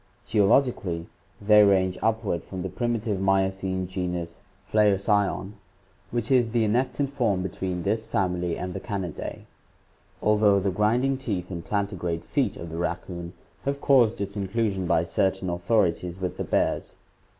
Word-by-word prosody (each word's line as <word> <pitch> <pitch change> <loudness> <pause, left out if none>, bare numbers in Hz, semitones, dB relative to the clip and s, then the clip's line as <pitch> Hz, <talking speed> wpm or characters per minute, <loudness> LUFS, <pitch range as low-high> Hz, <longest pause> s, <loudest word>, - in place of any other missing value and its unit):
Geologically 100 -5 +2 0.3
they 105 0 +6
range 95 -2 +4
upward 110 -5 0
from 95 -2 -6
the 95 - -3
primitive 115 -3 -1
Miocene 95 -1 +1
genus 90 -2 -4 0.2
Phlaocyon, 100 -1 +2 0.6
which 120 +1 -2
is 125 -3 +4
the 115 0 +1
annectant 130 +5 0
form 110 -9 0
between 90 -1 -3
this 110 +2 -1
family 90 -5 -1
and 90 0 -4
the - - -4
Canidae, 95 -7 -5 0.7
although 105 -1 +4
the 100 0 0
grinding 120 +7 +2
teeth 100 -9 -4
and 85 -2 -5
plantigrade 90 -5 -2
feet - - 0
of 85 -1 -7
the 80 - -5
raccoon 85 0 -4 0.3
have 140 0 -1
caused 125 -6 +4
its 100 0 -4
inclusion 100 -2 -1
by 80 - +3
certain 95 +1 0
authorities 90 -1 0
with 90 -1 -3
the - - -2
bears. - - 0
95 Hz, 140 wpm, -26 LUFS, 90-110 Hz, 0.7 s, they